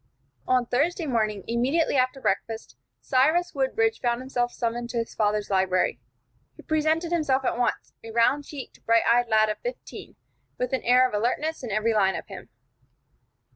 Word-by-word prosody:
On 255 -1 +2
Thursday 315 +9 0
morning, 215 -7 -1
immediately 260 +9 +1
after 255 +1 +1
breakfast, 220 - -2 0.3
Cyrus 305 - +2
Woodbridge 440 +12 0
found 240 -1 0
himself 245 -2 -2
summoned 235 0 -3
to 235 - -4
his 230 0 -3
father's 210 -1 0
library. 185 -8 +1 0.5
He - - -14
presented 315 +2 0
himself 275 -6 +1
at - - 0
once, 245 0 -2
a 225 - -9
round 235 +6 +2
cheeked, 280 -2 -10
bright 230 0 +4
eyed 245 +1 +3
lad 215 -1 +3
of 215 - -3
fifteen, - - -8 0.4
with 250 +1 -2
an 260 - 0
air 250 +1 +4
of 250 - -12
alertness 255 +9 -1
in 240 - -5
every 215 +2 +1
line 195 -3 +2
of - - -5
him. 195 -2 -11
245 Hz, 170 wpm, -25 LUFS, 220-275 Hz, 0.5 s, bright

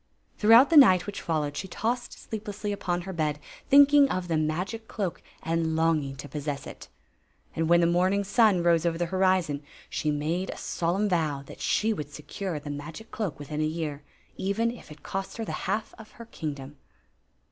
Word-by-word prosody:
Throughout 230 +7 +7
the 325 - +6
night 185 -10 +7
which 205 - -6
followed, 150 -4 -1
she 190 - -4
tossed 240 +6 -2
sleeplessly 210 -1 -5
upon 180 -3 -2
her 190 +2 -6
bed, 155 -3 -1 0.3
thinking 285 0 +7
of 185 -5 -3
the 165 - +1
magic 175 +9 -2
cloak 195 -6 -3 0.2
and 165 -1 0
longing 160 -4 +1
to 140 +2 -8
possess 145 0 -4
it - - -10 0.7
And 165 0 0
when 170 0 +6
the - - +4
morning 185 +4 +2
sun 200 -3 +3
rose 170 -2 +3
over 170 -1 0
the 175 - 0
horizon, 185 -6 +2 0.3
she 155 - -1
made 155 +6 -1
a - - -5
solemn 180 +5 -1
vow 155 -7 0
that - - -12
she 220 +1 +1
would 150 -8 -6
secure 160 +3 -5
the 145 0 -7
magic 155 +10 -8
cloak 200 -9 -3
within 150 +1 -4
a - - +2
year, 155 -2 -3 0.4
even 220 +5 0
if 240 - -12
it 150 -1 -13
cost 195 +3 -5
her 225 - -3
the - - -5 0.2
half 220 - -1
of 220 - -13
her 230 - -11
kingdom. 145 -8 -6
175 Hz, 190 wpm, -27 LUFS, 155-205 Hz, 0.7 s, Throughout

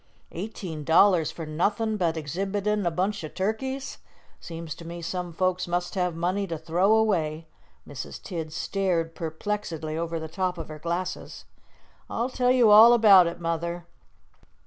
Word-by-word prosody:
"Eighteen 175 -4 -6
dollars 165 0 +4
for 160 0 -7
nothin' 205 +8 0
but 170 -5 0
exhibitin' 195 +6 -1
a - - +4
bunch 190 +4 -2
o' - - -3
turkeys! 260 - -3 0.4
Seems 165 -2 -7
to 170 - -12
me 170 +1 -7
some 180 +1 -4
folks 185 +2 0
must 175 0 -2
have 180 -3 -1
money 185 +4 -1
to 165 -2 -4
throw 175 +7 +2
away." 165 -8 +1 0.4
Mrs. - - -7
Tidd 165 -5 -6
stared 170 -1 -1
perplexedly 160 -1 -4
over 165 0 -2
the 160 - -5
top 180 +2 -2
of 165 -2 -7
her 155 0 -8
glasses. 175 +3 -4 0.6
"I'll 235 +3 -1
tell 250 -1 +1
you 245 -4 +5
all 225 +3 +9
about 200 -6 +7
it, 170 +1 -5
Mother." 170 +1 -3
175 Hz, 155 wpm, -26 LUFS, 165-205 Hz, 0.6 s, all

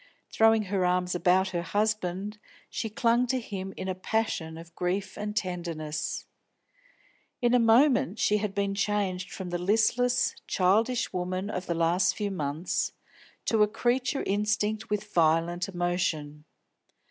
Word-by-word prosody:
Throwing 225 -1 +4
her 195 -1 -1
arms 180 0 +1
about 185 +2 +3
her 175 -2 -2
husband, 205 +2 -1 0.3
she 225 - -3
clung 235 +3 +2
to 260 +1 0
him 195 -5 -6
in 190 - -4
a 185 - 0
passion 185 -5 -2
of 165 0 -12
grief 190 +2 -2
and 210 0 -4
tenderness. 170 -6 -3 1.1
In 240 0 +2
a 250 - +6
moment 230 - +4
she 210 - +2
had 210 -1 -3
been 200 0 0
changed 200 -2 -1
from 185 -2 -6
the 175 - -1
listless, 235 +6 +2
childish 220 +7 +2
woman 185 +3 -2
of 180 -2 -4
the 170 - 0
last 170 +3 +2
few 205 -2 -2
months 155 -1 -2 0.5
to 220 -2 +2
a 210 - +6
creature 245 +5 0
instinct 210 +2 0
with 210 0 -3
violent 170 +3 +2
emotion. 175 -5 -2
195 Hz, 145 wpm, -28 LUFS, 180-215 Hz, 1.1 s, a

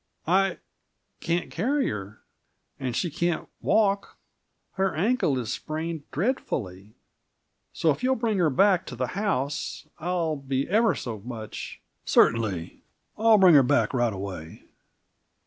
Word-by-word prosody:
"I 190 +2 +2 0.6
can't 170 +1 -1
carry 280 +4 0
her, 105 0 -7 0.6
and 125 -3 -3
she 175 - -1
can't 170 +2 -1
walk 200 -2 +1 0.5
her 195 0 -1
ankle 190 - +1
is 120 -4 -3
sprained 160 0 -5
dreadfully. 110 - -3 0.8
So 160 - +2
if 140 - -3
you'll 260 +1 +2
bring 225 -4 0
her 170 -3 +4
back 185 +5 +3
to - - -6
the 125 +1 -1
house, 155 -8 -2
I'll 170 -2 -1
be 135 -1 -2
ever 220 +1 +3
so 115 -4 -5
much 110 0 -7
" - - -50
"Certainly; 105 -8 +2 0.3
I'll 225 0 +5
bring 185 -3 +7
her 145 - +8
back 140 +2 +2
right 120 -3 +2
away." 95 -5 -7
155 Hz, 135 wpm, -26 LUFS, 120-195 Hz, 0.8 s, her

